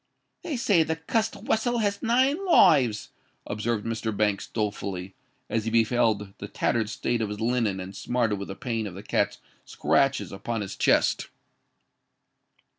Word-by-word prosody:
"They 330 Hz, -7 st, -3 dB
say 200 Hz, -7 st, +3 dB
the 160 Hz, 0 st, 0 dB
cussed 220 Hz, +7 st, -1 dB
wessel 240 Hz, +2 st, 0 dB
has 205 Hz, -3 st, 0 dB
nine 260 Hz, +9 st, +2 dB
lives," 140 Hz, -, +5 dB, 0.4 s
observed 105 Hz, +1 st, -2 dB
Mr. 110 Hz, -2 st, -3 dB
Banks, 105 Hz, -2 st, +1 dB
dolefully, 100 Hz, -3 st, -3 dB, 0.3 s
as 115 Hz, -1 st, -1 dB
he -, -, 0 dB
beheld 110 Hz, -3 st, +2 dB
the -, -, -6 dB
tattered 110 Hz, -3 st, 0 dB
state 120 Hz, +2 st, -1 dB
of 110 Hz, -, -1 dB
his 105 Hz, 0 st, -5 dB
linen 115 Hz, -4 st, 0 dB
and 95 Hz, +1 st, -7 dB
smarted 115 Hz, -3 st, 0 dB
with 100 Hz, -, -5 dB
the 95 Hz, -, -6 dB
pain 115 Hz, -2 st, -3 dB
of 90 Hz, -, -8 dB
the 100 Hz, -, -8 dB
cat's 100 Hz, -1 st, 0 dB, 0.3 s
scratches 135 Hz, 0 st, +1 dB
upon 110 Hz, +3 st, -4 dB
his 100 Hz, -1 st, -5 dB
chest. -, -, +2 dB
115 Hz, 155 wpm, -26 LUFS, 105-160 Hz, 0.4 s, lives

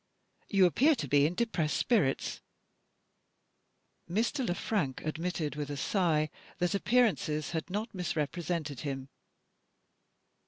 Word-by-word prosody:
You 195 Hz, -3 st, +5 dB
appear 280 Hz, -, +4 dB
to 150 Hz, -, -4 dB
be 145 Hz, +2 st, +4 dB
in 170 Hz, -, -4 dB
depressed 175 Hz, -9 st, 0 dB
spirits." 200 Hz, -, +1 dB, 1.7 s
Mr. 230 Hz, -, 0 dB
Le 175 Hz, -, 0 dB
Frank 165 Hz, -, -2 dB
admitted 160 Hz, -1 st, -2 dB
with 145 Hz, -1 st, -4 dB
a 145 Hz, -, -4 dB
sigh 155 Hz, -3 st, +1 dB, 0.3 s
that 175 Hz, +2 st, +1 dB
appearances 200 Hz, -, +2 dB
had 160 Hz, 0 st, -3 dB
not 210 Hz, +5 st, -3 dB
misrepresented 165 Hz, -4 st, -2 dB
him. 135 Hz, -2 st, -4 dB
170 Hz, 115 wpm, -31 LUFS, 150-200 Hz, 1.7 s, You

